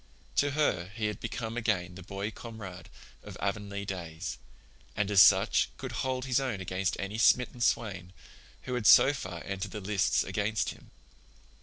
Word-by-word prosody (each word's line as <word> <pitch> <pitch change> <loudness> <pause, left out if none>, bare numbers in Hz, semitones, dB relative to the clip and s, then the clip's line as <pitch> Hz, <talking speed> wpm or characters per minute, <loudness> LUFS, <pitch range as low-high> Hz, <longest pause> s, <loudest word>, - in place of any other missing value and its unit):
To 145 - +4
her 90 - +1
he 110 -2 -2
had 105 -2 -2
become 115 -1 -4
again 105 -7 -1
the 95 - -10
boy 100 +3 -5
comrade 105 -7 -9 0.3
of - - -10
Avonlea 100 0 -3
days, 90 -1 -5 0.6
and 105 0 0
as 100 -2 +8
such - - +5
could - - -6
hold 130 -1 -2
his 130 0 +2
own 130 -7 -2
against 95 0 -2
any 100 +3 -4
smitten 125 +1 +3
swain 95 -7 0 0.5
who 125 - -4
had 120 -4 +1
so 135 - +8
far 95 -10 -6
entered 95 0 -4
the 105 - -6
lists 100 0 +1
against 105 +2 -1
him. - - -15
100 Hz, 165 wpm, -30 LUFS, 95-115 Hz, 0.6 s, as